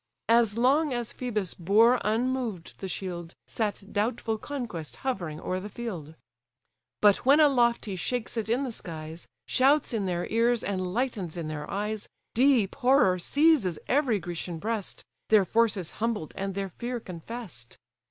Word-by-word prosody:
As 230 -2 +4
long 280 +5 +3
as 240 -1 -3
Phœbus 215 -8 -3
bore 225 +8 +5
unmoved 230 -4 -1
the 190 - -4
shield, 175 -2 -5
Sat 210 -2 -2
doubtful 220 +1 -1
conquest 230 - -5
hovering 170 -12 -2
o'er 185 +2 -2
the 205 +3 -7
field; 180 -10 -6 0.9
But 205 -1 +6
when 280 +4 +4
aloft 245 -6 +4
he 200 -3 -4
shakes 240 +7 -2
it 220 -2 -2
in 245 +4 +2
the 260 - -3
skies, 160 -5 -7 0.2
Shouts 275 +1 +3
in 205 -4 0
their 175 -1 -1
ears, 230 +1 +2
and 185 -2 -2
lightens 205 -7 -2
in 160 -2 -4
their 150 -1 -5
eyes, 210 +1 -3 0.2
Deep 245 -5 +4
horror 250 -9 +4
seizes 280 - +3
every 265 -5 +2
Grecian 175 -1 -5
breast, 215 +3 -3 0.2
Their 215 -3 +6
force 225 +2 +2
is 175 -3 -4
humbled, 220 -8 -2
and 195 0 -3
their 195 -1 -2
fear 240 +6 -4
confess'd. 180 - -7
215 Hz, 155 wpm, -28 LUFS, 180-245 Hz, 0.9 s, But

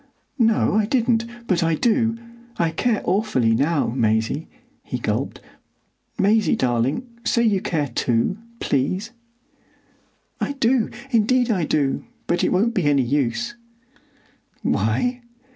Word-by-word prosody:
"No, 225 -2 +3
I 210 0 +2
didn't; 230 -2 +1 0.2
but 185 -6 +1
I 165 -1 +2
do,—I 235 -2 -1
care 230 +4 0
awfully 180 - +2
now, 145 +5 +1
Maisie," 115 +5 0 0.4
he - - -4
gulped,—"Maisie, 215 +1 -2
darling, 130 - 0 0.2
say 235 0 +2
you 205 -5 +2
care 160 -8 -1
too, 120 - 0 0.2
please." 185 - -1 1.3
"I 285 - -1
do, 255 -3 +2 0.2
indeed 245 +1 +3
I 180 -7 +1
do; 145 -3 0 0.2
but 175 0 0
it - - +2
won't 220 +6 +2
be 190 -8 0
any 140 -2 +3
use." 145 - -1 1.1
"Why?" 250 0 0
200 Hz, 115 wpm, -22 LUFS, 145-235 Hz, 1.3 s, No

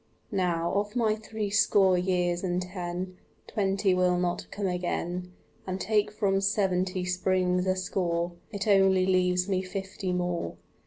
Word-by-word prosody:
Now, 175 -4 0
of 205 +3 -1
my 225 -3 +2
threescore 205 -3 +2
years 180 -1 0
and 180 -1 0
ten, 180 0 -5 0.3
Twenty 195 -1 +1
will 180 -1 +3
not 175 0 -1
come 205 - -4
again, 180 0 -2 0.4
And 185 0 -3
take 210 +1 +1
from 195 -2 +1
seventy 185 -2 +1
springs 180 0 +1
a 185 - +2
score, 175 -2 -1 0.2
It 200 -1 -3
only 195 -2 +5
leaves 180 -1 +2
me 190 -2 +1
fifty 190 0 -4
more. 175 - -2
185 Hz, 140 wpm, -28 LUFS, 180-195 Hz, 0.4 s, only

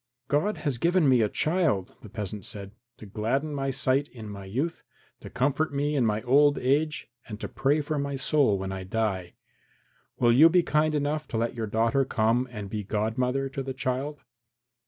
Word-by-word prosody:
"God 150 +10 +1
has 140 -6 -2
given 170 0 +3
me 130 -3 +5
a 105 - +2
child," 155 - 0
the 110 - -11
peasant 105 -1 -5
said, 100 0 -7 0.3
"to - - -11
gladden 120 +9 -2
my 135 -1 -2
sight 135 +1 +1
in 115 -6 -10
my 100 -1 -8
youth, 135 - -3 0.4
to - - -10
comfort 140 +4 0
me 145 +2 0
in 125 -5 +2
my 105 0 -1
old 145 +3 +4
age 145 +1 0 0.2
and 105 -2 -7
to - - -4
pray 145 +3 +1
for 150 0 -2
my 140 0 -2
soul 135 -6 +2
when 95 0 -4
I 95 -1 -5
die. 95 -3 -2 0.8
Will 120 -1 +4
you 155 +7 +8
be 175 +1 +4
kind 155 +1 +1
enough 150 +1 -1
to 115 - -3
let 115 +1 0
your 115 -2 -4
daughter 115 +6 +2
come 120 0 +1
and 105 -4 -6
be 105 +1 -4
godmother 125 +6 -1
to 135 0 -4
the 135 -1 -5
child?" 135 +3 -3
130 Hz, 195 wpm, -27 LUFS, 110-145 Hz, 0.8 s, you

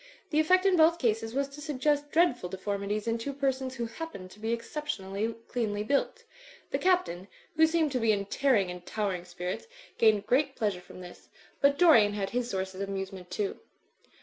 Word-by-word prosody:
The 305 - +3
effect 370 +4 +4
in 385 -2 +5
both 325 +1 +5
cases 225 -4 0
was 275 0 +1
to 285 +2 -11
suggest 290 0 0
dreadful 290 - +2
deformities 200 +3 -3
in 230 0 0
two 280 +5 -4
persons 265 -1 -1
who 240 -2 -2
happened 230 - -8
to 210 - -15
be 220 +1 -2
exceptionally 230 -5 -3
cleanly 210 -4 -1
built. 285 - 0 0.5
The - - 0
Captain, 350 - +1 0.3
who 320 +1 +6
seemed 320 -2 +1
to 255 - 0
be 225 -2 +3
in 200 -1 0
tearing 210 -5 +2
and 180 0 -8
towering 190 -3 -2
spirits, 180 - -5 0.3
gained 215 -3 +4
great 270 +4 +2
pleasure 205 -6 -1
from 180 - -12
this. 175 -1 -12 0.3
But 280 0 +4
Dorian 230 -13 +6
had 195 -2 -3
his 245 0 -1
sources 190 -2 -3
of 200 - -3
amusement 190 -2 -5
too. 205 -2 -3
230 Hz, 185 wpm, -29 LUFS, 195-285 Hz, 0.5 s, who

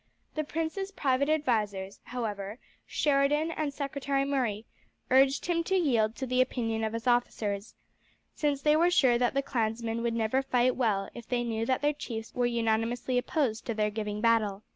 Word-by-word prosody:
The 310 - -1
prince's 330 +6 -3
private 280 -4 +1
advisers, 210 -10 0
however, 210 -4 -4 0.3
Sheridan 295 +2 +2
and 310 -3 -2
Secretary 275 -1 -1
Murray, 240 -6 -1 0.5
urged 270 +1 +4
him 335 -1 +1
to 385 - +1
yield 235 - +2
to 265 - -4
the 255 0 +2
opinion 225 -3 -1
of 220 0 -1
his 230 +1 -4
officers, 225 -4 0 0.6
since 290 -2 -1
they 300 0 +5
were 340 +3 +4
sure 260 -9 +4
that 245 +1 +1
the 275 - +1
clansmen 230 -2 -1
would 235 -1 -1
never 230 +4 +1
fight 255 -1 +2
well 210 -6 +1
if 235 -1 -10
they 245 -1 0
knew 225 -1 -2
that 260 +1 0
their 295 +1 +3
chiefs 225 -6 -6
were 245 -1 +1
unanimously 235 +2 0
opposed 245 -4 -1
to 230 - -2
their 210 0 +1
giving 210 -1 -3
battle. 215 -3 +2
245 Hz, 175 wpm, -29 LUFS, 225-280 Hz, 0.6 s, they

